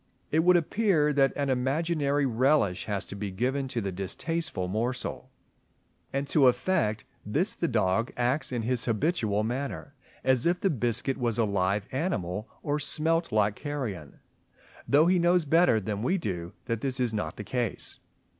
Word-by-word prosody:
It 155 - +3
would 180 +2 +5
appear 170 -4 +2
that 135 -1 +4
an 140 -2 0
imaginary 145 +2 +1
relish 125 -6 +2
has 100 -3 -2
to - - -7
be 100 0 -4
given 130 +8 -1
to 125 -3 -3
the 100 -2 -3
distasteful 100 - -3
morsel; 115 +7 -3 0.8
and 135 +1 -1
to 140 -4 +5
effect 125 - +1 0.2
this 155 - 0
the 170 - -1
dog 115 -2 +1
acts 130 +4 0
in 120 -3 -2
his 120 0 0
habitual 110 - 0
manner, 135 +4 -4 0.3
as 130 +2 +3
if 175 +1 +2
the 195 - +1
biscuit 125 0 0
was 120 -3 0
a 115 - +3
live 100 0 0
animal 110 - -2
or 145 0 0
smelt 165 +3 0
like 105 -1 +2
carrion, 125 - -5 0.7
though 145 +3 +5
he 180 +1 +4
knows 175 -1 +3
better 165 -6 +4
than 105 0 -3
we 130 - +1
do 90 - -4
that 115 -3 -2
this 135 -1 -1
is 120 -3 0
not 105 - -3
the 105 - -5
case. 120 -1 -3
130 Hz, 165 wpm, -28 LUFS, 105-150 Hz, 0.8 s, would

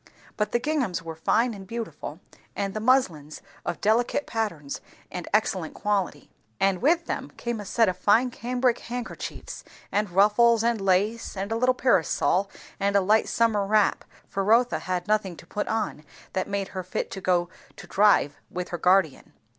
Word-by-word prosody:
But 210 -1 -1
the 240 - +2
ginghams 255 - -1
were 165 -1 -6
fine 225 +9 +1
and 195 -2 -10
beautiful, 230 +1 -6 0.3
and 195 -1 -2
the 215 - -3
muslins 190 - +1 0.2
of 175 - -3
delicate 235 +6 +2
patterns 170 -11 -3 0.3
and 180 -2 -5
excellent 190 -5 0
quality; 195 -8 -2 0.3
and 195 -2 +2
with 330 +5 +3
them - - -4
came 235 -2 -3
a 205 - -6
set 225 +3 +2
of 185 0 -1
fine 230 +6 +3
cambrick 245 +1 0
handkerchiefs, 245 +1 -6 0.3
and 210 0 0
ruffles, 215 +5 +4
and 230 -2 +1
lace, 200 +4 +1
and 195 +3 -3
a - - +1
little 255 +2 +2
parasol, 195 -4 +2 0.3
and 200 0 +1
a - - +7
light 215 +4 +3
summer 225 -3 +2
wrap; 210 +1 +2 0.2
for 195 - -2
Rotha 235 +5 +3
had 180 -1 -3
nothing 210 -5 0
to - - -13
put 205 - -3
on 215 -8 -2 0.3
that 185 - -2
made 200 -1 -2
her 190 - -4
fit 180 +1 -4
to 195 - -6
go 175 -1 +1 0.3
to - - -11
drive 200 -8 +3
with 180 0 -5
her 175 - -4
guardian. 180 -5 +2
205 Hz, 175 wpm, -26 LUFS, 185-230 Hz, 0.3 s, a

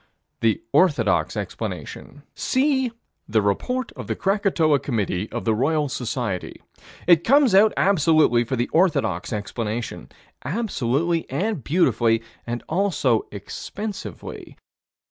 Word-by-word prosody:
The 115 -2 +1
orthodox 115 - +2
explanation: 145 0 -6
See 265 -2 +1 0.4
the 110 0 +3
Report 250 - -1
of - - -9
the - - -1
Krakatoa 190 -7 +2
Committee 105 -7 -2
of - - -4
the 110 - +3
Royal 145 +5 +1
Society. 120 -7 -3 0.5
It 170 -1 +5
comes 275 -1 +4
out 210 +3 +6
absolutely 155 -9 +4
for 125 +3 -3
the 120 0 0
orthodox 160 - +1
explanation 110 +2 -4 0.3
absolutely 165 - -1
and 180 - -2
beautifully, 120 - +2 0.4
also 160 - +1
expensively. 195 - -7
145 Hz, 105 wpm, -23 LUFS, 115-195 Hz, 0.5 s, out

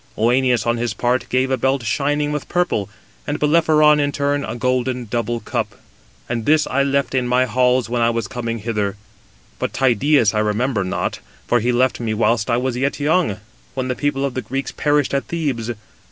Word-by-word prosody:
Œneus 120 0 +2
on 120 0 +1
his 115 -2 -2
part 125 +4 0
gave 130 +1 +1
a 130 - +2
belt 130 +1 0
shining 145 +5 0
with 150 -1 -4
purple; 175 - 0 0.4
and - - -2
Bellerophon 150 -1 +4
in 145 0 +1
turn 145 0 0
a 110 - -4
golden 125 0 -1
double 115 +1 -2
cup; - - -3 0.5
and 115 -2 -3
this 155 0 +4
I 140 - 0
left 140 0 0
in 130 -2 +1
my 125 +1 +3
halls 125 0 +2
when 120 0 -1
I 115 - +4
was 115 -3 -2
coming 115 0 -4
hither. 105 -3 -2 0.6
But - - -2
Tydeus 130 -2 +3
I 105 - +1
remember 105 +1 0
not, 90 - -2 0.3
for 120 - +2
he 120 +2 +1
left 125 +1 +1
me 110 -2 -2
whilst 115 +1 +1
I 120 - +2
was 125 0 -1
yet 135 +4 -1
young, 145 - +1 0.3
when 130 -1 -2
the 125 - -1
people 140 -1 -1
of 135 - -3
the 130 - -3
Greeks 135 +4 -4
perished 145 -2 +1
at 140 - 0
Thebes. 140 -9 -2
125 Hz, 195 wpm, -20 LUFS, 115-140 Hz, 0.6 s, Bellerophon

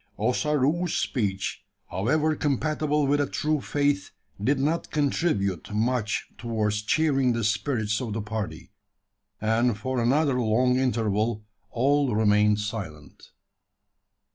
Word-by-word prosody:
Ossaroo's 150 - +1
speech, 100 -6 -2 0.3
however 150 - +1
compatible 150 +1 0
with 145 +1 +2
a 145 - 0
true 155 +1 -1
faith, 145 0 0 0.3
did 135 +4 +2
not 155 +5 0
contribute 135 - 0
much 110 0 0
towards 110 -3 -1
cheering 135 +1 +2
the 115 0 -2
spirits 110 -1 0
of 115 -4 -3
the 110 - -2
party; 110 -1 -5 0.7
and 110 +1 +1
for 130 +2 -2
another 135 +1 +2
long 125 +3 +2
interval 110 -3 0 0.2
all 135 0 +2
remained 105 -1 +3
silent. 100 - -7
120 Hz, 115 wpm, -26 LUFS, 105-145 Hz, 0.7 s, remained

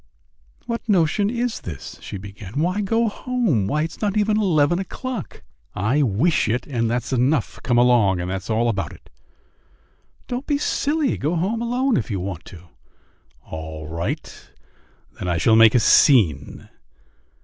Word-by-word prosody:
"What 235 0 -5
notion 195 +2 +2
is 240 0 -2
this?" 80 -7 -8
she - - -7
began. 100 +4 -8
"Why 180 +6 0
go 225 +3 +1
home? 215 - 0
Why, 150 +7 0
it's 165 - -6
not 210 -1 0
eleven 190 -7 +2
o'clock." 235 +2 -6 0.3
"I 115 +10 +1
wish 135 - +2
it, 120 +3 -1
and 115 -5 -1
that's 120 +2 -2
enough. 130 0 +1
Come 120 -2 +1
along, 120 -7 +4
and 90 +1 -3
that's 95 +2 -5
all 115 +2 +1
about 95 -8 -2
it." - - -18 1.2
"Don't 250 +3 -4
be 290 - +1
silly! 295 0 0
Go 155 +5 -1
home 200 +7 -1
alone 245 +2 +1
if 115 - -3
you 100 - -2
want 90 -2 -5
to." 90 -2 -13 0.8
"All 80 -1 -7
right; 85 +2 -5 0.7
then 90 - -4
I 85 -1 0
shall 110 +7 +4
make 115 0 +7
a - - +6
scene." 95 - +3
130 Hz, 155 wpm, -22 LUFS, -, 1.2 s, make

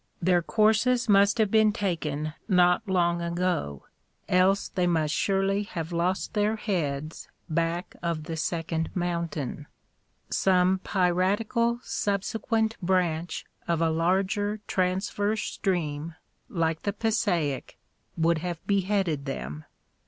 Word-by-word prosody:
Their 180 0 +3
courses 220 +6 +2
must 200 +1 +5
have 215 -3 +2
been 220 -1 +5
taken 160 -8 -2
not 180 +1 +3
long 175 -2 +2
ago, 170 - -2 0.4
else 185 +2 +3
they 180 -2 0
must 160 -3 +1
surely 195 0 +1
have 170 -5 -5
lost 175 +2 -1
their 210 0 +1
heads 155 -8 -3 0.2
back 165 +2 -1
of 170 -2 -2
the 165 +1 -5
second 165 0 -2
mountain; 170 -5 -3 0.6
some 185 0 +3
piratical 205 +6 +1
subsequent 220 +2 -1
branch 175 -2 0 0.2
of 170 -1 +1
a 165 -1 +2
larger 195 +5 +1
transverse 200 +3 0
stream, 160 -5 -2 0.3
like 165 -2 -1
the 200 - -1
Passaic, 200 - -1 0.4
would 165 0 +2
have 175 -1 -5
beheaded 195 -7 0
them. 75 - -5
180 Hz, 115 wpm, -27 LUFS, 165-200 Hz, 0.6 s, must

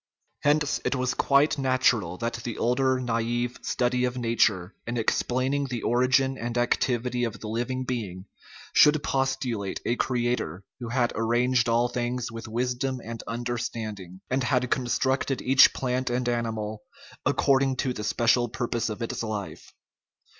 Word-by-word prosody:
Hence 150 0 +2
it - - 0
was 125 -1 0
quite 140 +1 +3
nat 130 -1 +4
ural 90 -6 -4
that 115 +1 -1
the 120 -3 -4
older 130 +2 +2
nai* 115 -2 0 0.2
ve 125 - -6
study 125 0 0
of 125 0 -1
nature, 110 -6 +1
in 120 +1 -2
explaining 130 +4 0
the 120 -3 -4
origin 130 +2 +2
and 120 +1 -3
activity 120 0 0
of 115 -3 -3
the 110 - -7
living 120 +4 -2
being, 105 -8 -4 0.5
should 150 0 +5
pos 135 0 +1
tulate 115 -7 -3
a 120 - +1
creator 120 -8 -1 0.2
who 120 -2 -5
had 120 -1 +1
"arranged 120 +2 +2
all 120 +1 +3
things 120 0 -3
with 115 0 -7
wisdom 125 +3 -1
and 115 0 -6
understanding," 115 -5 -4
and 130 0 0
had 125 -1 +1
constructed 130 +2 0
each 135 +1 +6
plant 130 0 -1
and 125 0 -1
animal 110 -3 -2 0.4
according 135 -1 +2
to 130 0 -1
the 105 - -6
special 120 +3 +2
purpose 115 0 -2
of 110 +2 -4
its 115 - -3
life. 110 -3 -5
120 Hz, 155 wpm, -26 LUFS, 115-130 Hz, 0.5 s, each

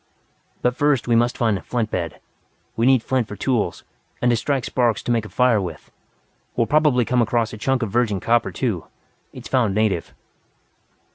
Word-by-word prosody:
"But 125 0 +2
first 145 -4 +1
we 120 - +3
must 120 +1 +2
find 110 -5 +1
a - - -12
flint 115 -3 -2
bed. 85 -3 -3 0.6
We 115 +2 +2
need 130 -3 +4
flint 130 -4 0
for 105 - -7
tools, 105 -4 -1 0.4
and 125 - +2
to - - +3
strike 130 +2 -1
sparks 120 -5 0
to - - -2
make 115 -2 +1
a - - -9
fire 125 -4 +3
with. 85 -5 -7 0.6
We - - +1
will - - +3
probably 150 -3 +3
come 125 +1 +2
across 115 0 0
a - - -6
chunk 130 +1 0
of 105 - -3
virgin 110 -3 +1
copper, 115 +4 +1
too 110 -11 -2 0.5
it's - - -10
found 115 -7 +1
native." 105 -6 0
120 Hz, 195 wpm, -22 LUFS, 110-125 Hz, 0.6 s, need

